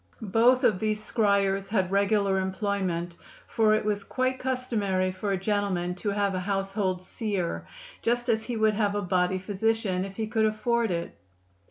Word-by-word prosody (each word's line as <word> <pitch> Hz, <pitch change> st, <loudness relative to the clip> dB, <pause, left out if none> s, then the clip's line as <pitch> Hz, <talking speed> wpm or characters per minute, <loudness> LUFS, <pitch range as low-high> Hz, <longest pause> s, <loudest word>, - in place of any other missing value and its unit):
Both 245 Hz, +3 st, +5 dB
of 185 Hz, -, +3 dB
these 215 Hz, 0 st, 0 dB
scryers 200 Hz, -3 st, +1 dB
had 190 Hz, -3 st, 0 dB
regular 200 Hz, -1 st, +2 dB
employment, 190 Hz, -3 st, -2 dB, 0.3 s
for 215 Hz, -2 st, +3 dB
it 215 Hz, -, -1 dB
was 205 Hz, -1 st, 0 dB
quite 255 Hz, +3 st, -1 dB
customary 210 Hz, -8 st, 0 dB
for 200 Hz, +2 st, -3 dB
a 195 Hz, -, +1 dB
gentleman 190 Hz, -3 st, -1 dB
to 205 Hz, -, -1 dB
have 200 Hz, -1 st, 0 dB
a 185 Hz, -, -1 dB
household 195 Hz, -1 st, -1 dB
seer, 185 Hz, -, -3 dB, 0.3 s
just 240 Hz, +1 st, 0 dB
as 225 Hz, -2 st, +2 dB
he 240 Hz, -2 st, -3 dB
would 220 Hz, 0 st, +3 dB
have 205 Hz, -1 st, 0 dB
a 205 Hz, -, -1 dB
body 180 Hz, 0 st, +1 dB
physician, 200 Hz, 0 st, 0 dB
if 195 Hz, 0 st, -7 dB
he 220 Hz, -, -1 dB
could 220 Hz, 0 st, +1 dB
afford 225 Hz, +2 st, 0 dB
it. 170 Hz, -1 st, -3 dB
200 Hz, 170 wpm, -27 LUFS, 190-220 Hz, 0.3 s, Both